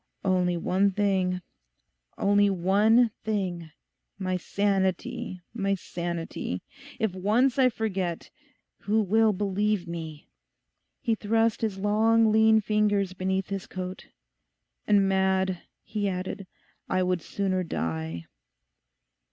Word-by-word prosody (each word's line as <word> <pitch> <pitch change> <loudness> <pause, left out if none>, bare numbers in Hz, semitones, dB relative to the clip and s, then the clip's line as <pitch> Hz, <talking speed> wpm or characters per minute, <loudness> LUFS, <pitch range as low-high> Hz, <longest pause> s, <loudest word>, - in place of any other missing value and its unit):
'Only 180 -2 +2
one 190 +4 +2
thing—only 185 - -1
one 205 +6 +3
thing—my 185 -1 -4
sanity, 190 -1 -1
my 195 -3 0
sanity. 170 - -4 0.3
If 220 -4 0
once 225 +8 +2
I 255 -1 +6
forget, 190 -7 -3 0.5
who 215 +2 +1
will 220 +3 +3
believe 205 -1 0
me?' 160 -3 -7 0.7
He 235 -4 +1
thrust 225 +1 +1
his 215 -4 -1
long 220 +2 +3
lean 220 0 +5
fingers 205 -2 +1
beneath 190 0 -2
his 195 -2 -4
coat. 185 0 -6 0.8
'And 200 -2 +4
mad,' 190 -1 +1 0.2
he 205 -2 -2
added; 185 +1 -4 0.4
'I 185 - +2
would 180 -1 0
sooner 190 0 -1
die. 80 - -3
195 Hz, 100 wpm, -27 LUFS, 180-210 Hz, 0.8 s, I